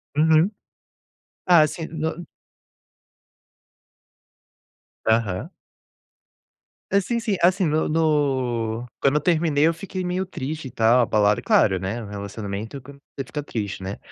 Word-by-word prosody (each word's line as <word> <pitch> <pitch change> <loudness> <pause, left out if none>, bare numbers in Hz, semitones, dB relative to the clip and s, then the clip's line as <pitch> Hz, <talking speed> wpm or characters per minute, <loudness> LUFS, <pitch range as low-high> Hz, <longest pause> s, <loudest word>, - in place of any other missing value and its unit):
Uhum. 160 +5 +4 0.9
Ah, 170 -4 +6
sim, 160 +2 -6
no 160 +2 -3 2.8
Aham. 110 -5 0 1.4
É 200 +1 +4
sim 235 +5 -2
sim, 215 -4 -1
assim 185 +2 +3
no 155 0 +1
no 130 -7 0 0.2
quando 140 +1 +3
eu 150 - +2
terminei, 155 -3 +2
eu 165 - +2
fiquei 185 +2 -6
meio 180 +1 -1
triste 155 -4 -5
e 125 - -9
tal, 115 +1 +4
abalado, 105 -3 +2
claro, 95 -3 +3
né. 95 +4 -3
É 120 - -6
um - - -8
relacionamento 100 +4 -6
quando 140 +2 -14 0.2
você 135 - -2
fica 150 +3 -5
triste, 105 -8 -5
né. 95 +2 -5
145 Hz, 130 wpm, -23 LUFS, 110-165 Hz, 2.8 s, Ah